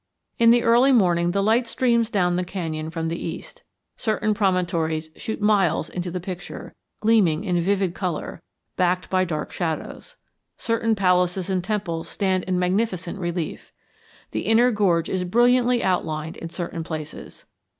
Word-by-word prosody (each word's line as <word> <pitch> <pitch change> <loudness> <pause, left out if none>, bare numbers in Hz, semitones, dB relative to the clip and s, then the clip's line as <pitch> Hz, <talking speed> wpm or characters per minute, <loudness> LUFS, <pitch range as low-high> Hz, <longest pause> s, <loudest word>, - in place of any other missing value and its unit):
In 230 0 +6
the 235 0 +5
early 240 +4 +5
morning 175 -8 +3
the 195 +3 0
light 230 +3 +2
streams 235 -2 +1
down 180 -5 +1
the 180 - 0
canyon 160 -4 -4
from 165 0 -3
the 165 +1 -4
east. - - -7 0.4
Certain 215 -1 0
promontories 170 -6 0
shoot 220 - -5
miles 195 -7 +2
into 180 0 -4
the 180 +1 -4
picture, 175 0 -7 0.3
gleaming 205 -7 +3
in 180 -4 0
vivid 190 0 +1
color, 175 -3 -4 0.3
backed 180 0 0
by 185 0 +2
dark 155 -4 -4
shadows. 175 - -4 0.4
Certain 230 -1 0
palaces 180 -1 +1
and 185 -2 0
temples 180 -5 -3
stand 190 -2 0
in 185 -1 0
magnificent 185 0 -1
relief. 175 -2 -4 0.6
The - - -3
inner 235 +3 +5
gorge 180 -6 +2
is 185 -1 -1
brilliantly 240 +5 +3
outlined 160 -4 -1
in 165 - -7
certain 170 -1 -5
places. 155 -2 -8
185 Hz, 150 wpm, -23 LUFS, 170-215 Hz, 0.6 s, In